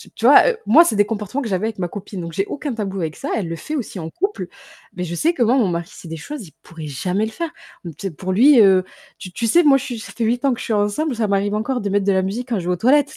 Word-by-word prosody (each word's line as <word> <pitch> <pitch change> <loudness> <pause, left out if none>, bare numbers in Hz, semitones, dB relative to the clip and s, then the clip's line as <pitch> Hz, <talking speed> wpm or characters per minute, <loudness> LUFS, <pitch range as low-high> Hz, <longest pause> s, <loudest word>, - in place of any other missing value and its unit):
tu - - -3
vois, - - +8
heu, 465 - -2
moi, 275 +11 +7
c'est 225 -10 0
des 205 - +4
comportements 215 +5 -3
que 240 - -4
j'avais 200 +1 -1
avec 220 -3 -6
ma 180 - -1
copine 200 +1 -8
donc 170 0 -7
j'ai 195 +4 0
aucun 290 -3 -4
tabou 200 -3 -4
avec 160 -2 -3
ça. 280 - -6
Elle 195 - -2
le 165 - -4
fait 305 - -6
aussi 225 -8 -5
en 160 0 -5
couple 395 - -3 0.5
mais 180 - -3
je 175 - -5
sais 325 - +1
que 260 - +1
moi, 235 +3 +3
mon 230 -7 +3
mari, 170 +1 -3
c'est 180 - -12
des 165 - -5
choses, 250 - -7
il 155 - -17
pourrait 160 -3 -9
jamais 180 +9 -1
le 220 - -6
faire. 335 +7 -4 0.4
Mmh, 170 - -5
tu 195 - -4
sais - - -5
pour 185 +4 -4
lui, 255 +5 +6
heu, 190 -2 +5 0.3
tu 185 - -9
tu 230 +5 -2
sais, 345 +9 +5
moi, 275 -2 +6
je - - -5
suis 240 -3 -5
ça - - -9
fait 235 - -3
8 240 +3 0
ans 265 - +3
que - - -6
je - - -5
suis 225 - -1
ensemble, 210 +8 0
ça 220 -2 0
m'arrive 200 +1 0
encore 245 +3 -2
de 205 - -2
mettre 200 0 +1
de 200 - +3
la 190 -1 +2
musique 225 +7 -4
quand 220 -5 0
je 170 - -6
vais 180 - +2
aux - - 0
toilettes 285 - +3
210 Hz, 330 wpm, -20 LUFS, 185-255 Hz, 0.5 s, vois